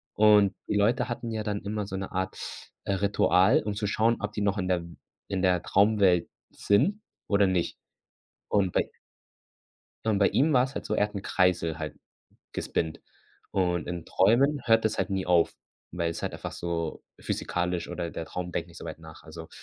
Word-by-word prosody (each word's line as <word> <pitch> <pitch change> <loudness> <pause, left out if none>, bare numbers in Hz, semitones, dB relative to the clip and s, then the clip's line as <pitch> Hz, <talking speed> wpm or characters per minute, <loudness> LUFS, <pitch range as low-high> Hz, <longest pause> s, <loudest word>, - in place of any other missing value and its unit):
und 105 -2 +5
die - - -1
Leute 115 +5 +2
hatten 120 0 -4
ja 110 -1 -2
dann 105 -1 -2
immer 105 0 -3
so 95 - -6
'ne 95 0 -4
Art, 95 0 -5
äh, 100 - 0
Ritual, 95 -1 +3
um 105 -1 -3
zu 105 0 -2
schauen, 115 +3 +2
ob 105 0 -3
die 105 - -4
noch 100 0 +1
in 90 -2 -1
der 90 -2 +1 0.4
in 95 -2 -2
der 90 -2 +3
Traumwelt 100 -4 +3 0.2
sind 160 - +1 0.3
oder 100 -1 +4
nicht. 95 -3 0 0.7
Und 100 -3 +2
bei - - 0 1.2
und 110 -3 +2
bei 100 - +5
ihm 155 +4 +2
war's 130 +1 +2
halt - - -4
so, 105 - -1
er 105 - +3
hat 105 - -20
'n 100 - -4
Kreisel 90 -4 +1
halt 75 -2 -6 0.5
gespinnt 80 -2 -2 0.5
und 90 -3 0
in 85 -1 -4
Träumen 135 +9 +3
hört 115 -1 +4
das 110 - 0
halt 95 0 0
nie 95 -1 -1
auf, 85 -2 +3 0.4
weil 85 -1 -1
es 85 - -6
halt - - -2
einfach - - -6
so 85 -2 -3 0.2
physikalisch 90 0 -2
oder 85 -1 -4
der 80 - -5
Traum 90 -1 -5
denkt 85 +1 -3
nicht 85 - -12
so - - -9
weit 80 -1 -6
nach. 80 -1 -13
Also, 80 +1 -10
95 Hz, 195 wpm, -28 LUFS, 85-105 Hz, 1.2 s, und